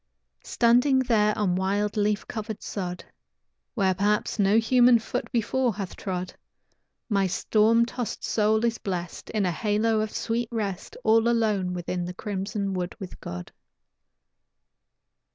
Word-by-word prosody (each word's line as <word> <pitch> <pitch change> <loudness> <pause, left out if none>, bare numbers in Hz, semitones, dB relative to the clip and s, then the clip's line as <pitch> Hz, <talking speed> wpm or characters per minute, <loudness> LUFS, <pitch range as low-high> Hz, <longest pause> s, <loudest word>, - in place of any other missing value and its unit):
Standing 245 +3 +3
there 215 -5 +2
on 200 -4 +1
wild, 200 +2 0
leaf 210 0 0
covered 220 -2 -5
sod, 180 -3 -5 0.7
Where 195 -4 +2
perhaps 210 +3 0
no 200 +2 +4
human 245 +1 +5
foot 225 - -4
before 245 -1 0
hath 195 -3 -5
trod 185 -1 -4 0.7
My 200 -4 +2
storm 220 +5 +3
tossed 245 0 -5
soul 220 +1 +2
is 230 -1 0
blest 180 -3 -5
In 210 -3 0
a 180 - +1
halo 215 +4 +1
of 215 - -2
sweet 230 +1 -2
rest, 205 -5 -4
All 225 +1 +4
alone 210 -6 +1
within 175 0 -3
the 180 +1 -6
crimson 200 0 -3
wood 180 -1 -3
with 190 -3 -8
God. 90 0 -7
210 Hz, 135 wpm, -26 LUFS, 190-225 Hz, 0.7 s, human